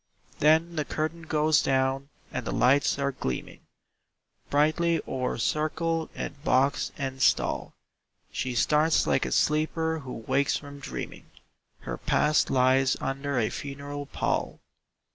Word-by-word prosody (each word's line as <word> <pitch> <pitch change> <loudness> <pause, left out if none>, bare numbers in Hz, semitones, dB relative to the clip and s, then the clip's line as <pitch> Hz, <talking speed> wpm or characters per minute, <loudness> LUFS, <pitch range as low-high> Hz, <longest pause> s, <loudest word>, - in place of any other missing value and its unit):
Then 160 +3 +3
the 150 - +1
curtain 155 +3 -3
goes 155 -1 +3
down 135 +1 0 0.2
and - - -3
the - - -3
lights 140 +3 +3
are 140 0 0
gleaming 65 - -5 0.9
Brightly 155 +3 +2
o'er 130 -1 -2
circle 160 +5 -1
and 140 +1 -6
box 135 -1 +2
and 135 -1 -4
stall. - - +1 0.6
She 125 -1 -3
starts 155 +5 +3
like - - +1
a - - -5
sleeper 160 +1 +1
who 130 -4 -8
wakes 140 0 +2
from 140 -1 -10
dreaming 140 - -7 0.5
Her - - -5
past 150 0 +2
lies 130 +1 +3
under 135 +1 -2
a 110 -3 +1
funeral 140 0 -6
pall. - - -2
145 Hz, 130 wpm, -27 LUFS, 135-155 Hz, 0.9 s, Then